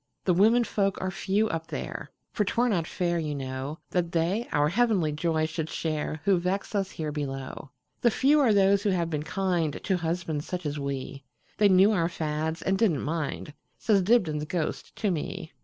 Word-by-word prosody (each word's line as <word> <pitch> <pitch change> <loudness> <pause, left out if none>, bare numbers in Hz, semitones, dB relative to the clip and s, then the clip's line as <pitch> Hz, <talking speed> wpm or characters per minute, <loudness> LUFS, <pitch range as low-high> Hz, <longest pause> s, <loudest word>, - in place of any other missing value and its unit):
"The 180 - +4
women 220 +7 +5
folk 195 -4 0
are 185 0 -2
few 205 +4 +1
up 165 0 -3
there; - - -5 0.2
For 210 - +1
't 195 - -3
were 245 +1 +4
not 175 -8 0
fair, 175 -1 -1
you 150 -2 -2
know, 135 +2 -4
That 175 -2 0
they 175 +8 0
our 150 0 +3
heavenly 200 -5 +2
joy 155 +1 0
should 155 0 -3
shareWho 160 +4 -1
vex 185 +5 -2
us 195 -2 0
here 155 -2 -4
below. 135 -2 -5 0.3
The 240 - +5
few 280 +6 +3
are 260 -6 +4
those 200 -1 +4
who 205 - +1
have 170 -3 0
been 150 -2 -1
kindTo 175 +1 -1
husbands 165 -3 -2
such 180 -2 -4
as 145 0 -2
we; 140 0 -4 0.4
They 205 -1 +6
knew 190 +3 +6
our 170 -5 +1
fads, 160 0 -3
and 190 0 +1
did 225 - +5
n't 145 - -2
mind,"Says 160 +6 -2
Dibdin's 180 -8 +2
ghost 160 0 -3
to 210 -3 0
me. 170 +1 -4
170 Hz, 190 wpm, -27 LUFS, 155-195 Hz, 0.4 s, They